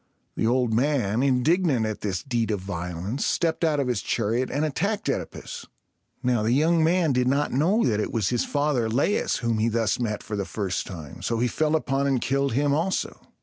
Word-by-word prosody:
The 110 Hz, -, 0 dB
old 125 Hz, -1 st, +2 dB
man, 120 Hz, -3 st, +1 dB
indignant 140 Hz, 0 st, +2 dB
at 110 Hz, -1 st, -4 dB
this 95 Hz, -3 st, -2 dB
deed 120 Hz, -4 st, -1 dB
of 105 Hz, -2 st, 0 dB
violence, 90 Hz, +5 st, -4 dB
stepped 165 Hz, 0 st, 0 dB
out 155 Hz, -3 st, +2 dB
of 135 Hz, -, 0 dB
his 120 Hz, -6 st, 0 dB
chariot 115 Hz, +5 st, 0 dB
and 145 Hz, +4 st, 0 dB
attacked 200 Hz, +8 st, -1 dB
OEdipus. -, -, -4 dB, 0.6 s
Now, 125 Hz, -3 st, +2 dB
the 110 Hz, +3 st, +1 dB
young 160 Hz, +4 st, +3 dB
man 165 Hz, -2 st, +3 dB
did 125 Hz, 0 st, +1 dB
not 140 Hz, +3 st, +1 dB
know 180 Hz, -, +2 dB
that 110 Hz, -3 st, +1 dB
it -, -, -2 dB
was 110 Hz, -5 st, 0 dB
his 120 Hz, -1 st, +1 dB
father 145 Hz, -6 st, 0 dB
Laius 135 Hz, -, +1 dB
whom 115 Hz, -2 st, +1 dB
he 115 Hz, +2 st, +2 dB
thus 115 Hz, -2 st, 0 dB
met 105 Hz, -4 st, -2 dB
for 105 Hz, -, -5 dB
the 100 Hz, -, -1 dB
first 95 Hz, -1 st, -3 dB
time, 80 Hz, -7 st, -9 dB
so 115 Hz, -, -1 dB
he 120 Hz, +2 st, +1 dB
fell 155 Hz, +5 st, +1 dB
upon 140 Hz, -2 st, 0 dB
and 135 Hz, -2 st, +2 dB
killed 140 Hz, +1 st, 0 dB
him 140 Hz, +3 st, +2 dB
also. 170 Hz, +6 st, -1 dB
125 Hz, 205 wpm, -25 LUFS, 110-145 Hz, 0.6 s, young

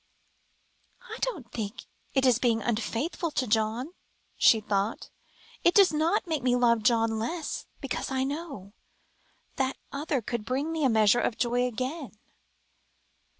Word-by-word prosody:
"I 485 Hz, -, -9 dB
don't 330 Hz, -, -3 dB
think 220 Hz, +2 st, -5 dB, 0.3 s
it 265 Hz, -1 st, +3 dB
is 245 Hz, -3 st, +4 dB
being 235 Hz, -3 st, +2 dB
unfaithful 240 Hz, +9 st, -1 dB
to 255 Hz, -, +2 dB
John," 225 Hz, +7 st, 0 dB, 0.4 s
she 225 Hz, -, +5 dB
thought; 205 Hz, 0 st, -2 dB, 0.5 s
"it 345 Hz, -, +4 dB
does 395 Hz, -5 st, +6 dB
not 325 Hz, +7 st, +1 dB
make 320 Hz, -5 st, -1 dB
me 245 Hz, 0 st, +2 dB
love 235 Hz, -2 st, +3 dB
John 225 Hz, 0 st, +2 dB
less, 320 Hz, +9 st, -4 dB
because 275 Hz, -3 st, -3 dB
I 265 Hz, -1 st, 0 dB
know 275 Hz, -, -5 dB, 0.8 s
that 265 Hz, 0 st, 0 dB
other 285 Hz, 0 st, -1 dB
could 235 Hz, 0 st, -3 dB
bring 270 Hz, +7 st, -2 dB
me 320 Hz, -2 st, -1 dB
a 265 Hz, -, +4 dB
measure 220 Hz, 0 st, +4 dB
of 225 Hz, -, -1 dB
joy 245 Hz, +1 st, +1 dB
again." 255 Hz, -, -5 dB
250 Hz, 145 wpm, -28 LUFS, 225-300 Hz, 0.8 s, does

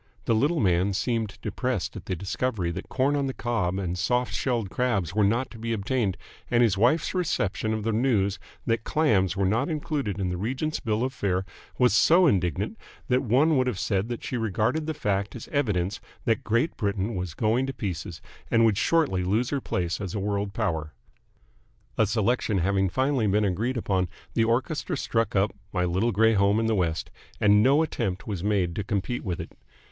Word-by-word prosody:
The -, -, +2 dB
little 145 Hz, +9 st, +2 dB
man 95 Hz, -2 st, +2 dB
seemed 110 Hz, 0 st, -1 dB
depressed -, -, -2 dB
at -, -, -9 dB
the 95 Hz, -, -1 dB
discovery 95 Hz, 0 st, -2 dB
that -, -, -7 dB
corn 135 Hz, +3 st, +1 dB
on 140 Hz, -1 st, 0 dB
the 130 Hz, -, -4 dB
cob 110 Hz, -7 st, -1 dB
and 90 Hz, -3 st, -2 dB
soft 125 Hz, +6 st, 0 dB
shelled 115 Hz, -7 st, -1 dB
crabs 100 Hz, -10 st, 0 dB
were 105 Hz, +1 st, +2 dB
not 115 Hz, +6 st, +1 dB
to 115 Hz, -, -11 dB
be 115 Hz, +1 st, -2 dB
obtained, 105 Hz, -2 st, -1 dB, 0.3 s
and 120 Hz, 0 st, +4 dB
his 110 Hz, -5 st, +3 dB
wife's 125 Hz, +10 st, +2 dB
reception 110 Hz, -, -1 dB
of 110 Hz, -1 st, -2 dB
the 115 Hz, -, 0 dB
news 105 Hz, -5 st, +1 dB, 0.3 s
that 115 Hz, -1 st, 0 dB
clams 100 Hz, -, +2 dB
were 100 Hz, -, +2 dB
not 115 Hz, -, +1 dB
included 145 Hz, -, -2 dB
in 95 Hz, -2 st, 0 dB
the 90 Hz, -, -2 dB
Regent's 130 Hz, -, -2 dB
bill 110 Hz, 0 st, -1 dB
of 130 Hz, +1 st, -2 dB
fare 95 Hz, -5 st, -1 dB, 0.3 s
was 125 Hz, -1 st, +4 dB
so 175 Hz, +3 st, +5 dB
indignant 90 Hz, -, 0 dB, 0.3 s
that 125 Hz, +1 st, +3 dB
one 140 Hz, +6 st, +3 dB
would 130 Hz, 0 st, +2 dB
have 120 Hz, -7 st, -1 dB
said 100 Hz, +1 st, -1 dB
that 120 Hz, -, -5 dB
she 125 Hz, -, -3 dB
regarded 115 Hz, +8 st, 0 dB
the 160 Hz, -, -2 dB
fact 100 Hz, -1 st, -1 dB
as 120 Hz, -, -8 dB
evidence 105 Hz, -9 st, 0 dB, 0.2 s
that 115 Hz, -4 st, +1 dB
Great 120 Hz, +8 st, +1 dB
Britain 100 Hz, 0 st, -1 dB
was 90 Hz, -5 st, -4 dB
going 115 Hz, -, +1 dB
to -, -, -2 dB
pieces 95 Hz, -6 st, -5 dB, 0.3 s
and 115 Hz, 0 st, +4 dB
would 110 Hz, -2 st, +2 dB
shortly 145 Hz, -, +2 dB
lose 110 Hz, +7 st, 0 dB
her 140 Hz, -2 st, -1 dB
place 90 Hz, -2 st, -2 dB
as 95 Hz, -1 st, -4 dB
a -, -, -1 dB
world 100 Hz, 0 st, -1 dB
power. 80 Hz, -5 st, -2 dB, 1.0 s
A 110 Hz, -, +4 dB
selection 110 Hz, 0 st, +1 dB
having 95 Hz, +2 st, +1 dB
finally 130 Hz, +2 st, +1 dB
been 105 Hz, +2 st, +2 dB
agreed 110 Hz, +7 st, -1 dB
upon, 95 Hz, -5 st, 0 dB, 0.2 s
the 115 Hz, -, +2 dB
orchestra 130 Hz, +8 st, -1 dB
struck 115 Hz, -5 st, -1 dB
up 100 Hz, +2 st, +2 dB, 0.2 s
"My 90 Hz, -1 st, 0 dB
Little 95 Hz, +7 st, +1 dB
Grey 110 Hz, +2 st, +4 dB
Home 100 Hz, +1 st, +3 dB
in 115 Hz, -, 0 dB
the 110 Hz, -, +2 dB
West," 85 Hz, -5 st, -1 dB, 0.3 s
and 105 Hz, 0 st, +5 dB
no 140 Hz, +7 st, +4 dB
attempt 105 Hz, -, -3 dB
was 100 Hz, -5 st, -4 dB
made 95 Hz, -5 st, +1 dB
to 105 Hz, -, -1 dB
compete 105 Hz, +3 st, -2 dB
with 90 Hz, -3 st, -3 dB
it. 85 Hz, -, -6 dB
110 Hz, 200 wpm, -26 LUFS, 95-125 Hz, 1.0 s, so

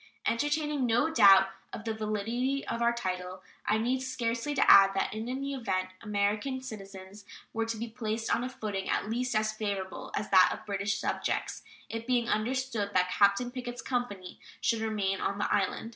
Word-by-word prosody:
Entertaining 295 Hz, +2 st, 0 dB
no 240 Hz, +8 st, +2 dB
doubt 195 Hz, -5 st, +7 dB, 0.2 s
of 220 Hz, -, -7 dB
the 225 Hz, -, -1 dB
validity 225 Hz, +6 st, -2 dB
of 230 Hz, -, -3 dB
our 235 Hz, 0 st, +4 dB
title, 185 Hz, -4 st, -4 dB, 0.2 s
I 215 Hz, -, +3 dB
need 245 Hz, +4 st, 0 dB
scarcely 255 Hz, +1 st, -2 dB
add 195 Hz, -6 st, +7 dB
that 195 Hz, -, 0 dB
in 220 Hz, +2 st, -4 dB
any 275 Hz, +2 st, -3 dB
event 185 Hz, -8 st, -2 dB
American 210 Hz, +5 st, -1 dB
citizens 195 Hz, -4 st, -9 dB, 0.3 s
were 225 Hz, 0 st, -1 dB
to 230 Hz, 0 st, -3 dB
be 230 Hz, +2 st, -4 dB
placed 225 Hz, -1 st, -2 dB
on 240 Hz, -, -2 dB
a 255 Hz, -, -3 dB
footing 205 Hz, -5 st, -4 dB
at 215 Hz, -, -1 dB
least 245 Hz, +1 st, -1 dB
as 215 Hz, 0 st, +2 dB
favorable 200 Hz, -3 st, -4 dB
as 210 Hz, -, -2 dB
that 185 Hz, -1 st, +7 dB
of -, -, -6 dB
British 200 Hz, 0 st, -1 dB
subjects, -, -, -2 dB, 0.3 s
it 230 Hz, +1 st, -6 dB
being 245 Hz, -2 st, +2 dB
understood 235 Hz, -1 st, -1 dB
that 180 Hz, 0 st, +3 dB
Captain 200 Hz, +5 st, +3 dB
Pickett's 245 Hz, -1 st, -6 dB
company 205 Hz, -8 st, -3 dB, 0.2 s
should 230 Hz, -2 st, +1 dB
remain 205 Hz, -3 st, -1 dB
on 200 Hz, -, -1 dB
the 205 Hz, -, 0 dB
island. 205 Hz, +3 st, 0 dB
220 Hz, 175 wpm, -30 LUFS, 200-245 Hz, 0.3 s, doubt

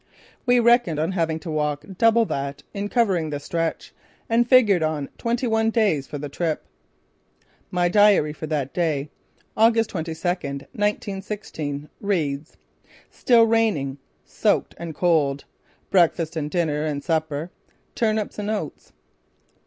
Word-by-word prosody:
We 245 Hz, 0 st, +5 dB
reckoned 235 Hz, -8 st, +4 dB
on 160 Hz, +4 st, 0 dB
having 165 Hz, -4 st, 0 dB
to 165 Hz, -, -6 dB
walk 150 Hz, -2 st, -1 dB
double 230 Hz, 0 st, +5 dB
that 140 Hz, -4 st, -4 dB
in 205 Hz, 0 st, -3 dB
covering 190 Hz, -10 st, +1 dB
the 145 Hz, -1 st, -3 dB
stretch, 165 Hz, +2 st, -3 dB, 0.3 s
and 235 Hz, +1 st, +2 dB
figured 220 Hz, -9 st, +5 dB
on 155 Hz, -3 st, -1 dB
twenty 235 Hz, +2 st, -1 dB
one 225 Hz, -1 st, +2 dB
days 205 Hz, -, +1 dB
for 145 Hz, -, -6 dB
the 145 Hz, +1 st, -5 dB
trip. 155 Hz, +2 st, -2 dB, 1.0 s
My 180 Hz, -1 st, +1 dB
diary 200 Hz, -5 st, +4 dB
for 155 Hz, +1 st, -7 dB
that 145 Hz, -4 st, -2 dB
day, 155 Hz, -4 st, -1 dB, 0.4 s
August 225 Hz, 0 st, +3 dB
22, 165 Hz, -1 st, -4 dB
1916, 190 Hz, -2 st, -4 dB
reads: 155 Hz, -7 st, -2 dB, 0.5 s
"Still 235 Hz, -2 st, +4 dB
raining. 210 Hz, -13 st, +1 dB, 0.3 s
Soaked -, -, 0 dB
and 165 Hz, -2 st, -6 dB
cold. 145 Hz, -6 st, +1 dB, 0.5 s
Breakfast, 170 Hz, -3 st, +3 dB, 0.2 s
dinner 155 Hz, -3 st, 0 dB
and 145 Hz, -2 st, -3 dB
supper: 160 Hz, +1 st, -1 dB, 0.4 s
turnips 215 Hz, -2 st, -1 dB
and 205 Hz, 0 st, -3 dB
oats." 215 Hz, -1 st, -5 dB
170 Hz, 130 wpm, -23 LUFS, 150-215 Hz, 1.0 s, We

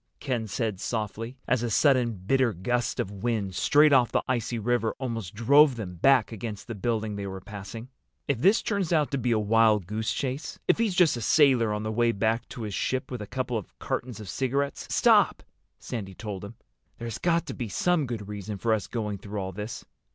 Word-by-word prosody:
Ken 120 Hz, -5 st, -2 dB
said 105 Hz, -1 st, -2 dB
softly, 115 Hz, +3 st, -4 dB
as 125 Hz, -1 st, +2 dB
a 120 Hz, -, -1 dB
sudden 125 Hz, 0 st, +3 dB
bitter 115 Hz, +5 st, +1 dB
gust 120 Hz, +6 st, -1 dB
of 95 Hz, -, -1 dB
wind 100 Hz, -1 st, -2 dB
straight 150 Hz, -, +4 dB
off 125 Hz, -3 st, +4 dB
the -, -, +1 dB
icy 120 Hz, -1 st, -1 dB
river 115 Hz, 0 st, 0 dB
almost 115 Hz, -8 st, -4 dB
drove 140 Hz, +5 st, +5 dB
them 100 Hz, -6 st, -6 dB
back 130 Hz, +11 st, +3 dB
against 110 Hz, -1 st, -6 dB
the 115 Hz, -, -5 dB
building 110 Hz, 0 st, -2 dB
they 100 Hz, -1 st, -4 dB
were 95 Hz, 0 st, -6 dB
passing. 105 Hz, +4 st, -8 dB, 0.4 s
"If 140 Hz, -5 st, 0 dB
this 195 Hz, -, +4 dB
turns 200 Hz, -5 st, -1 dB
out 155 Hz, -4 st, +2 dB
to 140 Hz, -, -1 dB
be 125 Hz, -, -1 dB
a 115 Hz, -, +3 dB
wild 110 Hz, -2 st, +3 dB
goose 110 Hz, +4 st, -2 dB
chase—if 135 Hz, -, -2 dB
he's 220 Hz, -5 st, +1 dB
just 175 Hz, -8 st, +4 dB
a -, -, -5 dB
sailor 125 Hz, -3 st, +4 dB
on 105 Hz, 0 st, -2 dB
the 110 Hz, -, -2 dB
way 120 Hz, +1 st, +2 dB
back 110 Hz, +3 st, 0 dB
to 125 Hz, -2 st, -7 dB
his 105 Hz, -2 st, -4 dB
ship 130 Hz, +7 st, -2 dB
with 125 Hz, -3 st, -4 dB
a 105 Hz, -, -6 dB
couple 125 Hz, -1 st, -2 dB
of 100 Hz, -, -14 dB
cartons 120 Hz, -3 st, -4 dB
of 105 Hz, -, -8 dB
cigarettes—" 135 Hz, +6 st, -2 dB
"Stop!" -, -, +4 dB, 0.3 s
Sandy 95 Hz, -6 st, -6 dB
told 105 Hz, -2 st, -6 dB
him. 100 Hz, +3 st, -8 dB, 0.4 s
"There's 115 Hz, -2 st, -5 dB
got 170 Hz, -1 st, +1 dB
to -, -, -5 dB
be 120 Hz, -4 st, -5 dB
some 165 Hz, -, +1 dB
good 110 Hz, -4 st, -5 dB
reason 105 Hz, 0 st, -5 dB
for 110 Hz, +3 st, +1 dB
us 110 Hz, -, -1 dB
going 105 Hz, -4 st, -3 dB
through 105 Hz, +1 st, -5 dB
all 95 Hz, -1 st, -3 dB
this." 105 Hz, +4 st, -6 dB
115 Hz, 210 wpm, -27 LUFS, 105-130 Hz, 0.4 s, drove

